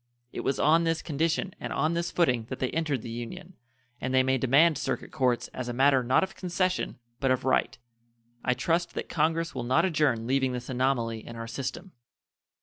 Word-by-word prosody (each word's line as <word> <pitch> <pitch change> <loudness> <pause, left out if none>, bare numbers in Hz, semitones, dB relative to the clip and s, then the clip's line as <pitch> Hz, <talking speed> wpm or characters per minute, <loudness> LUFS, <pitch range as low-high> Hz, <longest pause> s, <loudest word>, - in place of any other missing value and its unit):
It - - -5
was 135 - -1
on 160 +3 +4
this 165 0 0
condition 165 +5 -1
and - - -5
on 155 +4 +1
this 170 0 -1
footing 125 -10 +1
that 130 - -4
they 130 - -1
entered 155 -7 -1
the 115 - -6
Union, 175 +11 -7 0.5
and 130 - -3
they 130 0 +4
may 130 0 +1
demand 140 +4 +4
circuit 135 - -3
courts 125 -4 +1
as 130 -1 -5
a - - -2
matter 135 +1 +4
not 130 +7 +3
of 190 - -5
concession, 185 0 -1 0.2
but 135 - +1
of 130 0 +1
right. 120 -4 +1 0.7
I 125 - +2
trust 165 +7 0
that - - -4
Congress 165 +1 0
will 130 - -3
not 130 +8 +3
adjourn 145 -10 +1
leaving 130 0 +1
this 125 +1 -5
anomaly 125 -3 0
in 115 - -8
our 115 0 -5
system. 135 +10 -5
135 Hz, 200 wpm, -28 LUFS, 125-165 Hz, 0.7 s, on